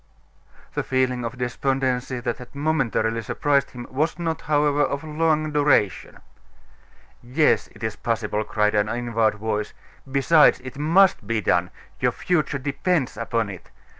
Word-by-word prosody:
The - - -1
feeling 130 -1 0
of 115 +2 -5
despondency 130 0 -1
that 120 -1 -2
had 125 +2 -12
momentarily 135 -7 0
surprised 140 +5 0
him 120 -1 -9
was 155 +6 0
not, 165 -2 -2
however, 145 -1 +2
of 140 0 0
long 155 0 0
duration. 145 - +1 1.0
"Yes, 135 +6 +2
it - - -15
is 110 -1 -3
possible," 110 -2 -1
cried 105 -1 0
an 105 0 +1
inward 115 -2 0
voice. 105 0 -3 0.4
"Besides, 150 +3 +5
it 130 +1 -9
must 165 - +3
be 115 0 0
done; 90 -3 +1 0.3
your - - +1
future 155 -5 0
depends 145 +2 -1
upon 115 -1 -2
it. 95 - -12
130 Hz, 140 wpm, -23 LUFS, 115-150 Hz, 1.0 s, Besides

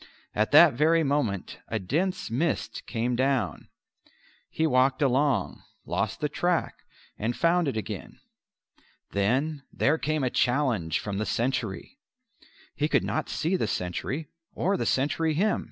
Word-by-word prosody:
At 110 +1 +1
that 155 +1 +8
very 160 +5 +3
moment 135 - -1
a 110 - -2
dense 175 - -1
mist 150 +7 -2
came 120 +1 -1
down; 130 -5 0 0.8
he 160 - 0
walked 130 -2 +3
along, 135 0 +1 0.2
lost - - -2
the 150 - +1
track, 175 +3 0 0.5
and 115 +3 -1
found 170 0 +3
it 130 - -1
again. 105 -3 -6 0.9
Then 130 +10 0
there 155 +3 +1
came 155 -1 -1
a 125 - 0
challenge 120 - +1
from 100 -1 -4
the 110 - -1
sentry. 125 - -2 0.7
He 150 - 0
could - - +2
not 155 - -2
see 170 +4 0
the - - 0
sentry 125 - -3 0.3
or 195 +3 0
the - - -1
sentry 150 +4 +1
him. 210 +7 +2
140 Hz, 140 wpm, -27 LUFS, 115-160 Hz, 0.9 s, that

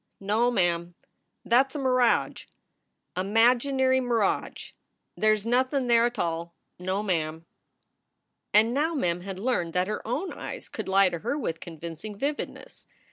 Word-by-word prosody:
"No 215 +5 +2
ma 240 -6 +2
am, 170 0 -1 0.5
that 250 +4 +4
s 270 - -20
a - - -1
miradge 255 -3 +1 0.7
a 185 - -1
maginary 255 +5 +3
miradge. 235 -5 -1 0.4
They 215 0 +3
s 215 -1 0
nothin 255 +3 +1
there 235 -1 +4
at 240 - -6
tall 170 -3 -3 0.2
no 190 +3 -2
ma 195 -3 +1
am." 160 0 -3 1.1
And 220 +2 +4
now 315 +5 0
Mem 175 - 0
had 190 0 -6
learned 190 -6 -1
that 180 +1 +1
her 210 - -3
own 290 +11 -2
eyes - - -8
could - - -6
lie 195 0 +5
to 170 - -5
her 240 - -2
with 165 - -3
convincing 170 +5 -8
vividness. 290 - -5
215 Hz, 160 wpm, -27 LUFS, 180-255 Hz, 1.1 s, lie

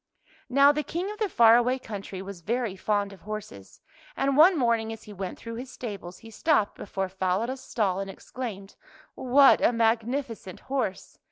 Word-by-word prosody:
Now 275 +2 +6
the 300 +1 -1
King 355 +6 -4
of 425 - -9
the 425 -3 0
far 230 -5 +6
away 250 +2 +1
countiy 200 -5 -7
was 195 -2 -9
very 230 +1 -2
fond 205 0 -1
of 190 - -15
horses, 210 - -8 0.4
and 275 0 +1
one 330 +4 +7
morning 230 -4 +1
as 225 -1 -8
he 210 - -11
went 190 -2 -5
through 230 0 -8
his 250 +2 -7
stables 200 -8 -7
he 225 -1 -13
stopped 220 -3 +1
before 195 -1 -4
Falada's 190 +7 -2
stall 195 -5 -1
and 195 0 -4
exclaimed, 200 -1 -7 0.3
" - - -39
What 265 +2 +5
a - - +4
magnificent 230 -2 -1
horse! 260 -8 -4
225 Hz, 180 wpm, -27 LUFS, 195-260 Hz, 0.4 s, one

